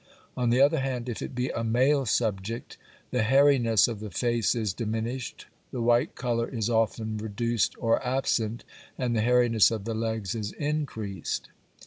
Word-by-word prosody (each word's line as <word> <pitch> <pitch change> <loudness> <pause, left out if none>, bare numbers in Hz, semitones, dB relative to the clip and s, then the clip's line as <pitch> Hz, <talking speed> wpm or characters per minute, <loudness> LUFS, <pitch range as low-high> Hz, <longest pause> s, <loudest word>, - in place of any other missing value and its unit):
On 125 -1 0
the 120 +2 +3
other 140 0 +4
hand, 130 -2 -3
if 120 - -4
it - - -6
be 125 +1 -1
a 115 - -3
male 130 +4 +2
subject, 110 +1 -1 0.4
the - - +1
hairiness 120 -4 +4
of 115 -4 -4
the 105 0 -6
face 115 +5 +1
is 110 -5 -1
diminished, 115 +4 -4 0.2
the 125 - -5
white 120 +4 +2
colour 120 -2 -1
is 115 -2 -2
often 110 -1 0
reduced 110 +1 -1
or 115 +3 +1
absent, 120 -3 0 0.3
and 125 -2 -1
the 110 - +2
hairiness 120 -3 +4
of 110 -3 -4
the 115 - -2
legs 110 -3 -2
is 105 -2 -4
increased. 135 - -3
115 Hz, 165 wpm, -27 LUFS, 110-125 Hz, 0.4 s, other